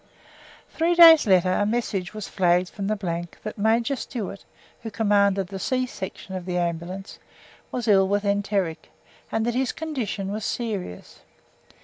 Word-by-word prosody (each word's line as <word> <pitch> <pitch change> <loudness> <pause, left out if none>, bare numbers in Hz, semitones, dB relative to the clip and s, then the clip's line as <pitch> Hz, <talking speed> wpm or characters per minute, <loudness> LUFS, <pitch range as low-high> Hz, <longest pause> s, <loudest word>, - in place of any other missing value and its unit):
Three 335 +2 +1
days 330 -6 +9
later 185 -2 +4
a 195 - +1
message 205 -4 -2
was 215 - -5
flagged 180 -1 +2
from 200 -2 -5
the 215 - 0 0.5
that 215 - -5
Major 230 +5 +2
Stewart 220 -6 -6 0.4
(who 225 - -5
commanded 200 -2 +2
the 195 +1 -7
C 255 +6 0
Section 190 -4 -8
of 185 -2 -5
the 180 -1 -1
Ambulance) 175 +3 -4 0.5
was 245 -2 -3
ill 195 -2 +5
with 205 +1 0
enteric, 200 -4 -1 0.4
and 225 0 0
that 240 - 0
his 255 +1 0
condition 245 -11 -4
was 215 +1 -4
serious. 205 - -4
205 Hz, 150 wpm, -24 LUFS, 190-230 Hz, 0.5 s, days